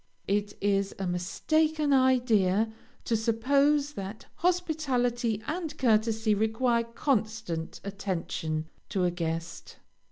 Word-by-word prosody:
It 205 Hz, +1 st, -1 dB
is 195 Hz, -1 st, +1 dB
a 195 Hz, -, -3 dB
mistaken 300 Hz, -, +1 dB
idea 225 Hz, -6 st, +3 dB, 0.3 s
to 230 Hz, -, +1 dB
suppose 280 Hz, +6 st, +2 dB
that 200 Hz, 0 st, -7 dB
hospitality 255 Hz, -, 0 dB
and 325 Hz, 0 st, -4 dB
courtesy 220 Hz, -2 st, +2 dB
require 230 Hz, +3 st, +1 dB
constant 215 Hz, -, -2 dB
attention 170 Hz, -5 st, -3 dB, 0.2 s
to 190 Hz, -, 0 dB
a 175 Hz, -, +2 dB
guest. 165 Hz, -1 st, -4 dB
220 Hz, 100 wpm, -28 LUFS, 195-260 Hz, 0.3 s, idea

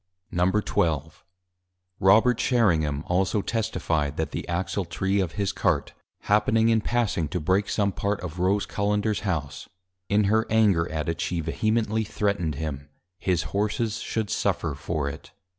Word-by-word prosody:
XII. 90 Hz, -4 st, +2 dB, 1.0 s
Robert 110 Hz, +5 st, +5 dB
Sherringham 80 Hz, -, +2 dB
also 95 Hz, +3 st, +1 dB
Testifi'd, 85 Hz, -10 st, -1 dB
That 80 Hz, -, -2 dB
the -, -, -5 dB
Axle 90 Hz, +2 st, -2 dB
Tree 95 Hz, +4 st, -1 dB
of 90 Hz, -4 st, -1 dB
his 100 Hz, -2 st, -1 dB
Cart, -, -, 0 dB, 0.3 s
happening 110 Hz, +2 st, +3 dB
in 110 Hz, -1 st, +3 dB
passing, 105 Hz, -9 st, 0 dB
to 90 Hz, -, -3 dB
break 95 Hz, +6 st, +1 dB
some 100 Hz, -2 st, +1 dB
part 100 Hz, +1 st, -2 dB
of 90 Hz, -1 st, -6 dB
Rose 95 Hz, +3 st, +2 dB
Cullenders 105 Hz, +1 st, 0 dB
House, 75 Hz, -9 st, -3 dB, 0.4 s
in 105 Hz, +1 st, +3 dB
her 110 Hz, +3 st, +2 dB
Anger 100 Hz, -7 st, +3 dB
at 75 Hz, -2 st, -3 dB
it, 80 Hz, +1 st, -2 dB
she 90 Hz, 0 st, -1 dB
vehemently 110 Hz, +6 st, 0 dB
threatned 100 Hz, -7 st, -1 dB
him, 75 Hz, -1 st, -5 dB, 0.3 s
_His 90 Hz, -3 st, +1 dB
Horses 105 Hz, +2 st, -1 dB
should 110 Hz, -3 st, -3 dB
suffer 80 Hz, -, 0 dB
for 75 Hz, 0 st, -3 dB
it. 70 Hz, -, -8 dB
95 Hz, 145 wpm, -25 LUFS, 80-105 Hz, 1.0 s, Robert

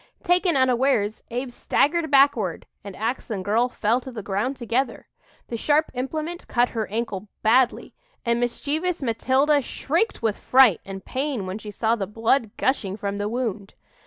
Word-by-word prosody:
Taken 355 Hz, -4 st, +2 dB
unawares, 255 Hz, -4 st, +2 dB
Abe 245 Hz, +2 st, -3 dB
staggered 315 Hz, +6 st, +1 dB
backward 280 Hz, 0 st, +3 dB, 0.2 s
and 200 Hz, -2 st, -8 dB
ax 230 Hz, +5 st, -3 dB
and 195 Hz, -4 st, -3 dB
girl 230 Hz, +5 st, +2 dB
fell 235 Hz, +1 st, 0 dB
to 260 Hz, -, -8 dB
the 220 Hz, -4 st, -7 dB
ground 210 Hz, +8 st, -2 dB
together. 240 Hz, +1 st, -2 dB, 0.4 s
The 235 Hz, -, -3 dB
sharp 300 Hz, +6 st, +2 dB
implement 310 Hz, +7 st, -4 dB
cut 245 Hz, 0 st, +2 dB
her 220 Hz, -3 st, -3 dB
ankle 210 Hz, -2 st, -3 dB, 0.2 s
badly, 245 Hz, +3 st, +2 dB, 0.3 s
and 235 Hz, 0 st, +1 dB
mischievous 295 Hz, +8 st, -1 dB
Matilda 265 Hz, +5 st, +2 dB
shrieked 330 Hz, -, -1 dB
with 220 Hz, -2 st, 0 dB
fright 250 Hz, -9 st, +5 dB
and 195 Hz, -1 st, -8 dB
pain 265 Hz, -6 st, -2 dB
when 185 Hz, +3 st, -5 dB
she 215 Hz, -, -9 dB
saw 220 Hz, +2 st, +1 dB
the 195 Hz, -4 st, -3 dB
blood 225 Hz, +3 st, +1 dB
gushing 210 Hz, -7 st, 0 dB
from 200 Hz, -1 st, -3 dB
the 205 Hz, +1 st, -1 dB
wound. 220 Hz, -4 st, -3 dB
240 Hz, 160 wpm, -24 LUFS, 215-275 Hz, 0.4 s, fright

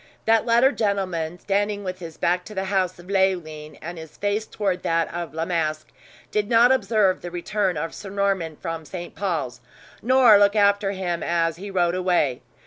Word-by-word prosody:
That 225 Hz, +1 st, +3 dB
latter 235 Hz, +4 st, +5 dB
gentleman, 185 Hz, -, -1 dB
standing 205 Hz, +2 st, -1 dB
with 185 Hz, -1 st, -5 dB
his 165 Hz, -3 st, -9 dB
back 180 Hz, +1 st, +1 dB
to 210 Hz, -, -10 dB
the 190 Hz, -, -1 dB
house 185 Hz, -2 st, +1 dB
of 175 Hz, -, -14 dB
Leoline, 175 Hz, -6 st, -1 dB
and 170 Hz, +1 st, -6 dB
his 160 Hz, -1 st, -12 dB
face 205 Hz, +2 st, -1 dB
toward 195 Hz, -4 st, -2 dB
that 165 Hz, 0 st, 0 dB
of 170 Hz, -3 st, -5 dB
La 165 Hz, 0 st, -1 dB
Masque, 155 Hz, -3 st, -2 dB, 0.4 s
did 210 Hz, -1 st, 0 dB
not 235 Hz, +1 st, +6 dB
observe 210 Hz, -6 st, +2 dB
the 175 Hz, -, -6 dB
return 180 Hz, +1 st, -1 dB
of 165 Hz, +2 st, -3 dB
Sir 200 Hz, -, -8 dB
Norman 195 Hz, -5 st, -1 dB
from 165 Hz, +1 st, -5 dB
St. 175 Hz, +2 st, -8 dB
Paul's, 155 Hz, -11 st, -3 dB, 0.4 s
nor 245 Hz, -3 st, +6 dB
look 205 Hz, +1 st, +4 dB
after 200 Hz, -1 st, +3 dB
him 180 Hz, -3 st, -3 dB
as 165 Hz, -1 st, 0 dB
he 200 Hz, +3 st, -7 dB
rode 175 Hz, -3 st, +1 dB
away. 175 Hz, -9 st, +1 dB
185 Hz, 185 wpm, -23 LUFS, 165-205 Hz, 0.4 s, not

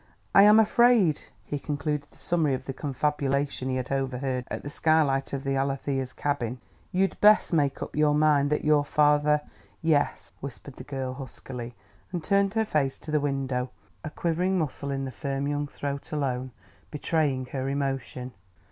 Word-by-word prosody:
"I 195 Hz, -, +8 dB
am 210 Hz, +2 st, +8 dB
afraid," 220 Hz, -7 st, +4 dB, 0.2 s
he 145 Hz, -, -3 dB
concluded 145 Hz, 0 st, -2 dB
the -, -, -23 dB
summary 160 Hz, -6 st, +1 dB
of 130 Hz, -, -8 dB
the 135 Hz, -, -4 dB
confabulation 140 Hz, -1 st, -1 dB
he 130 Hz, -, 0 dB
had 130 Hz, 0 st, -3 dB
overheard 130 Hz, -1 st, -1 dB
at -, -, -5 dB
the 145 Hz, -, -5 dB
skylight 150 Hz, -4 st, +2 dB
of 135 Hz, -1 st, -3 dB
the 135 Hz, -1 st, 0 dB
Alethea's 135 Hz, -1 st, -1 dB
cabin, 130 Hz, -5 st, -2 dB, 0.3 s
"you'd 190 Hz, +1 st, 0 dB
best 210 Hz, -3 st, +6 dB
make 145 Hz, -4 st, +1 dB
up -, -, -8 dB
your 150 Hz, 0 st, +3 dB
mind 150 Hz, -2 st, +3 dB
that 150 Hz, -, 0 dB
your 150 Hz, -1 st, +4 dB
father 150 Hz, 0 st, +3 dB, 0.2 s
" -, -, -32 dB
"Yes," 145 Hz, -, 0 dB
whispered 140 Hz, 0 st, -9 dB
the -, -, -8 dB
girl 135 Hz, -3 st, -4 dB
huskily; 125 Hz, -2 st, -8 dB, 0.4 s
and 175 Hz, -3 st, -3 dB
turned 200 Hz, +3 st, +2 dB
her 220 Hz, 0 st, +2 dB
face 140 Hz, -9 st, 0 dB
to 155 Hz, -, -8 dB
the 150 Hz, -, +3 dB
window, 135 Hz, -3 st, -1 dB, 0.3 s
a 155 Hz, -, -4 dB
quivering 175 Hz, +4 st, 0 dB
muscle 145 Hz, -3 st, -3 dB
in 135 Hz, -1 st, -2 dB
the 130 Hz, -, -5 dB
firm 140 Hz, 0 st, -3 dB
young 145 Hz, 0 st, -1 dB
throat 140 Hz, 0 st, -5 dB
alone 130 Hz, -4 st, -1 dB, 0.4 s
betraying 145 Hz, -3 st, 0 dB
her 135 Hz, -1 st, -2 dB
emotion. 135 Hz, -2 st, -3 dB
145 Hz, 175 wpm, -27 LUFS, 135-150 Hz, 0.4 s, I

